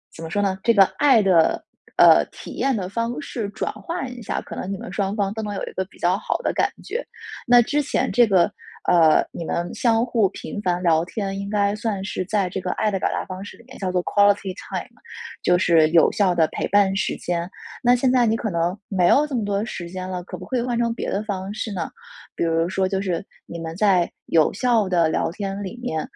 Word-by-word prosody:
怎 165 - -9
么 160 - -6
说 205 - 0
呢， 195 -2 0
这 230 - +4
个 200 - +8 0.2
爱 270 -6 +5
的， 175 -4 +3 0.3
呃， - - +7
体 - - -10
验 270 -2 0
的 190 -4 -3
方 230 +5 -2
式 225 -7 -4
转 205 - -3
换 335 -7 -5
一 245 - -10
下， 220 - -3
可 - - -9
能 190 - -5
你 195 - -3
们 180 - -8
双 200 0 -1
方 200 -2 -1
都 220 - -4
能 210 -2 -4
有 - - -4
一 - - -9
个 190 - -1
比 - - -21
较 175 +1 +2
好 - - -2
的 - - 0
感 - - +1
觉。 485 - -4 0.4
那 245 0 +7
之 295 +5 0
前 285 - -1
这 240 -1 +5
个， 185 -4 +4 0.4
呃， 160 -3 +5
你 170 - -6
们 170 +2 -3
相 230 -1 +2
互 225 -6 +2
频 205 - -7
繁 180 -1 -1
聊 165 -2 +3
天， 195 0 -4
应 200 0 -5
该 205 -1 +1
算 215 -3 -3
是 185 - -3
在 200 0 0
这 190 - -4
个 180 - -2
爱 215 - 0
的 195 - -1
表 - - 0
达 - - -3
方 185 +1 -7
式 205 - -10
里 - - -18
面 - - -13
叫 185 -2 -2
做 180 -1 0
quality 205 -1 +2 0.2
time， - - -4 0.6
就 180 - +4
是 165 -4 +4
有 165 0 +5
效 185 -4 +2
的 160 -2 +3
陪 - - -2
伴 200 -1 +3
时 195 - -1
间。 175 0 -3 0.3
那 245 0 +5
现 250 +1 +2
在 245 -2 +4
你 225 - +2
可 215 - -3
能 170 +2 -1
没 185 -3 +2
有 290 +9 +5
这 300 - -8
么 225 - 0
多 200 +1 -1
时 175 -7 -6
间 185 +1 -6
了， 180 -1 -4
可 180 - -7
不 180 - -9
可 260 - -2
以 240 - +1
换 240 -1 -1
成 235 -1 +1
别 - - -4
的 205 +2 -1
方 195 -2 -4
式 220 - -4
呢？ 170 -4 -3 0.5
比 - - -1
如 165 0 +1
说 190 0 0
就 190 0 -1
是， 185 -2 -2 0.2
你 170 - -8
们 165 0 -6
在 185 -3 +2 0.2
有 160 -2 +3
效 225 -2 +1
的 170 -3 +3
聊 160 - 0
天 195 +2 -4
里 195 +5 -7
面， 160 -10 -2
195 Hz, 290 characters per minute, -22 LUFS, 180-220 Hz, 0.6 s, 个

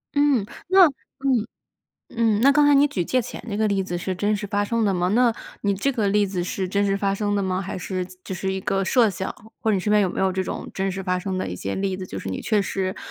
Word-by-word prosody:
嗯， 285 -7 +3 0.2
那 375 0 +7
嗯， 265 -3 -2 0.7
嗯， 225 -2 +2
那 275 +3 +6
刚 295 +1 +4
才 290 - +6
你 285 +1 +5
举 195 -11 -2
借 255 +9 +1
钱 240 - -8
这 205 - -3
个 215 0 +2
例 200 -2 +1
子 175 -1 -3
是 185 +1 -3
真 205 +3 +1
实 205 0 -5
发 205 +1 0
生 230 +1 0
的 200 - +2
吗？ 180 0 +1
那 235 +3 +3 0.3
你 200 -1 +1
这 205 +9 0
个 225 -6 0
例 205 +1 +3
子 185 -2 -2
是 185 +1 -3
真 200 +2 +1
实 195 0 +1
发 195 0 0
生 205 0 -1
的 200 - 0
吗？ 185 -1 -1
还 190 - -5
是 185 0 -3
子 185 0 -15
只 - - -5
是 190 +1 -2
一 190 - -3
个 195 0 0
设 235 +1 +4
想， 190 0 -4 0.3
或 220 - 0
者 - - +3
你 - - 0
身 210 +3 -1
边 210 0 +5
有 190 - +1
没 - - -4
有 190 0 +2
这 190 +1 -1
种 - - -5
真 195 0 -1
实 190 +1 -5
发 180 0 0
生 190 0 -3
的 - - -2
一 90 - -4
些 95 +2 -4
例 190 -1 -1
子， 185 - -6
就 - - -6
是 - - -6
你 95 - -4
确 215 -2 +2
实 190 -1 -2
200 Hz, 310 characters per minute, -23 LUFS, 185-220 Hz, 0.7 s, 那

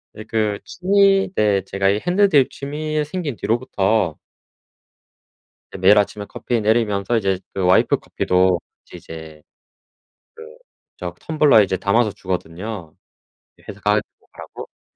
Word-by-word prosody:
네 110 - -8
그 110 -2 -1
취미 195 +1 +2
네 100 -2 +2
제가 95 0 0
이 100 - +1
핸드드립 180 -7 +3
취미 150 +2 -3
생긴 155 -4 -4
뒤로부터 110 -6 0 1.5
이제 - - -9
매일 105 - +6
아침에 105 0 -1
커피 120 +2 -3
내리면서 110 0 +1
이제 95 -3 0
그 95 - -3
와이프 90 +1 +4
커피도 90 0 +1 0.3
같이 - - -12
이제 80 -2 -11 0.9
그 460 +1 -12 0.4
저 - - -6
그 - - -33
텀블러에 150 -8 +4
이제 95 - -2
담아서 105 +4 +1
주거든요. 90 -2 -6 0.6
예 - - -24
회사 100 - -9
가지고 105 +1 -2
가라고. - - -10
네네. - - -82
105 Hz, 295 characters per minute, -20 LUFS, 95-145 Hz, 1.5 s, 매일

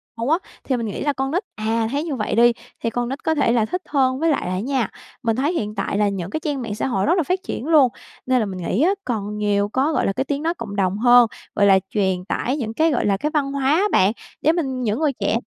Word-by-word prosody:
cùng 230 +1 -3
nhau 310 - +3
á, - - -21
thì 260 - 0
mình 230 - -3
nghĩ 205 - -4
là 290 0 +1
con 270 0 -2
nít 360 +6 0
à, 225 +1 0
thấy 285 +2 -1
như 320 -4 -3
vậy 215 -3 -2
đi, 235 +1 +5 0.3
thì 230 - +1
con 240 +1 -2
nít 270 - -5
có 320 0 +1
thể 285 - +2
là 230 -2 +2
thích 360 +11 -3
hơn. 260 -2 +2
Với 330 - +2
lại 280 - -1
là 180 - -2
á 185 - -1
nha, 255 -1 -1 0.3
mình 225 -1 +1
thấy 285 +7 0
hiện 210 -10 -3
tại 200 0 -2
là 205 -1 +3
những 185 -3 -4
cái 310 - -3
trang 290 -4 -3
mạng 215 -3 -4
xã 220 - -2
hội 195 -6 0
rất 330 - +3
là 345 - +2
phát 370 +6 -1
triển 285 -7 -5
luôn, 300 -6 +5 0.4
nên 255 0 +2
là 220 - +1
mình 190 -2 -5
nghĩ 185 +6 -1
á 350 +5 +4
còn 210 -3 -3
nhiều 205 -1 +1
có, 275 +7 +1
gọi - - +1
là, 195 - +1
cái 265 - -1
tiếng 285 +1 -2
nói 330 +1 +1
cộng 215 -8 -7
đồng 195 0 0
hơn, 245 +1 +6 0.3
gọi 205 - +4
là, 195 -1 +6
truyền 190 -3 0
tải 255 +7 -1
những 225 -4 -3
cái, 320 +5 +2
gọi 250 - 0
là, 200 -1 +2
cái 300 - -1
văn 285 -3 0
hóa 275 0 +1
á 375 - +2
bạn. 190 +2 +4 0.3
Để 310 - +4
mình- 270 -7 -2
những 215 +3 0
người 300 -3 +1
trẻ 230 - +1
245 Hz, 300 wpm, -21 LUFS, 210-290 Hz, 0.4 s, hơn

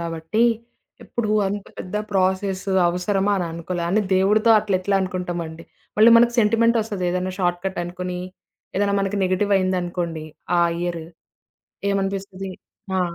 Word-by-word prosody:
గాబట్టి. 165 +6 -1 0.6
ఎప్పుడు 225 -3 -3 0.2
అంత 200 +1 -3
పెద్ద 185 - -7 0.2
ప్రాసెస్ 190 0 0 0.2
అవసరమా? 195 +3 0
అని 175 - -1
అనుకోలే. 170 +1 -4
అయిన 195 +5 +2
దేవుడితో 210 +4 +3
అట్ల 205 -3 0
ఎట్లా 195 +1 +1
అనుకుంటామండి? 175 -3 -4 0.3
మళ్ళీ 225 +2 +8
మనకు 235 +1 +4
సెంటిమెంటొస్తది 225 -2 +2
ఏదైనా 180 +1 -2
షార్ట్‌‌కటనుకోని. 180 0 -2 0.6
ఏదైనా 200 0 +2
మనకి 195 +1 -1
నెగెటివయిందనుకోండి 185 -4 0 0.3
ఆ - - +5 0.2
ఇయర్. 175 -2 -2 0.9
ఏమనిపిస్తది? 195 -1 -3 0.5
ఆ! - - +2
185 Hz, 115 wpm, -22 LUFS, 175-205 Hz, 0.9 s, మళ్ళీ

